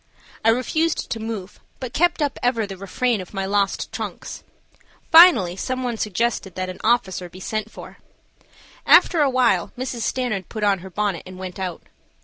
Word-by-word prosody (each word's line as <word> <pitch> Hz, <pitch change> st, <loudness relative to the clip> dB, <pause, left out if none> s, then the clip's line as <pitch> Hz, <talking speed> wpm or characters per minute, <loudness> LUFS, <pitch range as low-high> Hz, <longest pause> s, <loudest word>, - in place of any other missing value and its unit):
I 225 Hz, -, +4 dB
refused 305 Hz, +7 st, 0 dB
to 225 Hz, -, -2 dB
move, 220 Hz, -4 st, -6 dB, 0.2 s
but 255 Hz, -2 st, -6 dB
kept 345 Hz, -1 st, +2 dB
up 285 Hz, -, -2 dB
ever 240 Hz, -3 st, +1 dB
the 195 Hz, -1 st, -7 dB
refrain 205 Hz, +4 st, -1 dB
of 185 Hz, +2 st, -11 dB
my 195 Hz, 0 st, -2 dB
lost 200 Hz, 0 st, 0 dB
trunks. -, -, -6 dB, 0.7 s
Finally 255 Hz, -, +7 dB
some 255 Hz, +5 st, -3 dB
one 245 Hz, -2 st, -2 dB
suggested 215 Hz, -2 st, -2 dB
that 185 Hz, 0 st, -3 dB
an 185 Hz, -, -8 dB
officer 190 Hz, -6 st, +1 dB
be 185 Hz, -, -13 dB
sent 215 Hz, +3 st, -3 dB
for. -, -, -12 dB, 0.9 s
After 335 Hz, -4 st, +6 dB
awhile 255 Hz, -4 st, +2 dB
Mrs. 250 Hz, -2 st, -4 dB
Stanard 225 Hz, -6 st, -2 dB
put 215 Hz, -2 st, -5 dB
on 200 Hz, -2 st, +3 dB
her 190 Hz, +2 st, -10 dB
bonnet 195 Hz, -2 st, -2 dB
and 185 Hz, 0 st, -10 dB
went 185 Hz, 0 st, -7 dB
out. 180 Hz, -3 st, -4 dB
215 Hz, 170 wpm, -22 LUFS, 190-250 Hz, 0.9 s, Finally